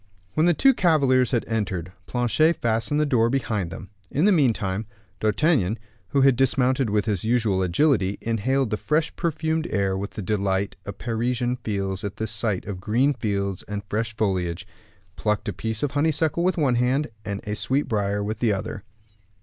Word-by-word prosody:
When 155 +2 +3
the 175 - +4
two 270 - +5
cavaliers 140 - +3
had 120 -3 0
entered, 95 -6 -2 0.2
Planchet 120 +7 +2
fastened 115 +5 0
the 150 - +3
door 120 -5 +3
behind 110 -8 -1
them. 95 - -9 0.2
In 150 +6 +1
the 210 - +5
meantime, 110 - +1 0.3
D'Artagnan, 110 - +2 0.3
who 140 +7 +1
had 135 -1 +5
dismounted 130 -1 +2
with 105 -1 +1
his 105 -5 -1
usual 110 -4 +1
agility, 100 - +2
inhaled 115 +2 0
the 105 - 0
fresh 155 +5 0
perfumed 160 0 -1
air 100 -2 0
with 100 +2 -3
the 105 - -4
delight 100 0 0
a - - -2
Parisian 120 +3 -1
feels 100 -4 -3
at 100 0 -4
the 110 - -3
sight 110 -2 -1
of 95 -3 -6
green 125 +9 +2
fields 100 -5 -2
and 105 0 -4
fresh 110 +1 -1
foliage, 95 -4 -1 0.5
plucked 105 -1 -1
a 105 - -1
piece 110 +5 -3
of 145 - 0
honeysuckle 160 +3 +1
with 185 +1 +1
one 140 -6 +2
hand, 130 +4 +1
and 100 -1 -4
of 105 0 -2
sweet 140 +3 0
briar 100 -1 0
with 105 +1 -3
the 115 -3 +2
other. 100 0 -4
110 Hz, 180 wpm, -24 LUFS, 100-135 Hz, 0.5 s, two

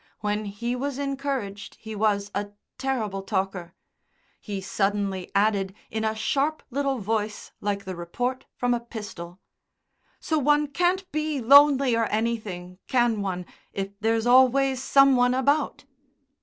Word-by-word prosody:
When 210 0 -1
he 235 +5 -3
was 275 +1 -3
encouraged 275 -7 -3
he 220 0 -9
was 205 -1 +1
a 205 0 -2 0.3
terrible 230 -8 -2
talker. 190 -3 -3 0.6
He 205 -2 -5
suddenly 195 -1 -1
added 200 -2 +2 0.2
in 220 0 -2
a 220 0 0
sharp 280 +7 0
little 275 0 0
voice 215 -1 -3
like 200 -1 -2
the 190 -1 -5
report 245 +10 -3
from 245 0 +1
a 240 - 0
pistol: 205 -6 -8 0.8
"So 315 -1 0
one 295 +1 +3
can't 360 +6 0
be 305 -1 -1
lonely 275 0 +6
or 230 0 +2
anything, 210 -5 -3
can 240 -4 +2
one, 180 -2 -3 0.3
if 195 0 -3
there's 225 +1 +1
always 260 +1 +4
some 275 0 +5
one 245 0 +3
about?" 280 +2 +1
225 Hz, 140 wpm, -25 LUFS, 200-270 Hz, 0.8 s, lonely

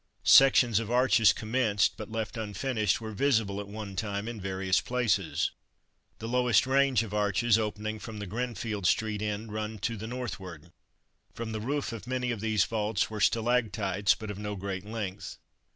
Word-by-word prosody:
Sections 125 -5 +6
of 115 -2 -5
arches 125 -3 +5
commenced, 110 -2 +1
but 110 - -8
left 110 0 -3
unfinished, 110 0 -1
were 110 -1 -6
visible 110 -4 +1
at 100 - -6
one 100 -1 -7
time 100 0 -3
in 115 -3 -6
various 95 0 0
places. 115 -8 0 0.7
The 115 - -6
lowest 125 -2 +3
range 135 -3 +3
of 105 -2 -8
arches 105 +2 +2
opening 110 0 -3
from 110 -1 -8
the 105 - -5
Grinfield 110 -2 -3
street 110 0 +1
end 105 +1 -3
run 110 0 -4
to 115 - -1
the 110 +1 -6
northward. 95 -9 -7 0.6
From 115 -1 -5
the 110 -1 -4
roof 140 +4 -2
of 115 0 -8
many 125 -1 -1
of 115 - -3
these 110 -3 +2
vaults 105 0 -1
were 105 -1 -4
stalactites, 110 -4 +2
but 110 -1 -6
of 100 - -8
no 105 0 -4
great 95 0 -5
length. 105 -3 -5
110 Hz, 170 wpm, -29 LUFS, 100-115 Hz, 0.7 s, Sections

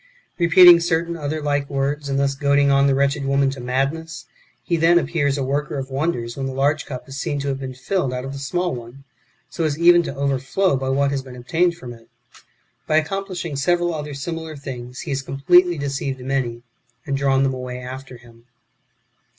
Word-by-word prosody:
Repeating 175 0 +8
certain 170 0 -1
other 155 -1 -4
like 145 -1 -1
words, 140 +1 -2
and 135 - 0
thus 140 0 +1
2;oadino; 140 0 +3
on 140 0 +4
the 135 - +3
wretched 140 +1 +1
woman 135 0 +2
[to 135 - -8
madness], 140 +7 -2 0.4
he 170 - 0
then 165 +1 +4
appears 150 -4 0
a 140 - -1
worker 145 +2 -2
of 135 0 -5
wonders 130 -5 -2
when 135 -1 -3
the 130 - -5
large 140 +2 +1
cup 130 -2 -7
is 135 +1 -7
seen 145 - -2
to 140 0 -2
have 135 -1 -2
been 130 -1 -6
filled 135 +1 -1
out 125 0 -4
of 135 - -6
the 140 - -6
small 175 +6 -1
one, 120 +2 -9 0.4
so 165 - -4
as 150 -2 0
even 175 +1 +6
to 170 - -5
overflow 140 +6 0
by 130 0 -2
what 140 +1 +1
has 140 -1 -1
been 130 -1 -11
obtained 170 +7 0
from 125 -8 -9
it. 115 -1 -18 0.8
By 155 - +3
accomplishing 175 -1 -2
several 175 +5 +1
other 150 -2 -5
similar 160 +2 -5
things, 125 -3 -7
he - - -6
has 135 0 -1
completely 175 +6 +3
deceived 140 -1 -3
many, 125 -3 -2 0.4
and 140 - -1
drawn 135 -1 +2
them 135 -1 +1
away 125 -1 -6
after 130 0 -8
him. 120 -1 -19
140 Hz, 200 wpm, -21 LUFS, 135-160 Hz, 0.8 s, Repeating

